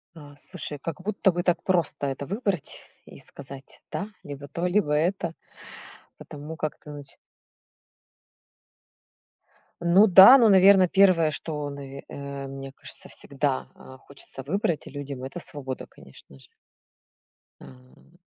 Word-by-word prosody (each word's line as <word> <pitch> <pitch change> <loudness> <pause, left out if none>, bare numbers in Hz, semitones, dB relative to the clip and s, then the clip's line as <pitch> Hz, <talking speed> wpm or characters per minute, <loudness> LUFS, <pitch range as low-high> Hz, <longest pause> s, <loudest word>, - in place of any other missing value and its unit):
А 145 -2 -12
слушай, 150 -3 -7
как 165 +4 -6
будто 200 -1 +1
бы 175 0 -2
так 175 -2 +1
просто 170 -6 0
это 135 +1 -4
выбрать 200 - -3 0.2
и - - -14
сказать 135 0 -10
да, 200 - -3 0.2
либо 145 0 -8
то, 170 +5 -4
либо 175 -5 +1
это. 170 +2 0 0.8
Потому 150 +2 -9
как 155 - -4
ты 150 - -12
начи 145 -1 -8 2.6
Ну, 180 +5 +5
да, 195 +8 +10
ну, 230 -3 +5
наверное, 190 -1 +7
1, 180 -4 +4
что, 150 -1 -3
наве 140 -1 -9
э, 140 -1 -7
мне 135 0 -8
кажется, - - -10
всегда, 140 -1 -3
а, 130 - -14
хочется 140 -1 -8
выбрать 170 +1 -2
людям- 140 -2 -7
это 135 +6 -6
свобода, 135 -5 -6
конечно 70 0 -17
же. - - -18 1.1
А. 130 +6 -18
150 Hz, 130 wpm, -25 LUFS, 140-180 Hz, 2.6 s, да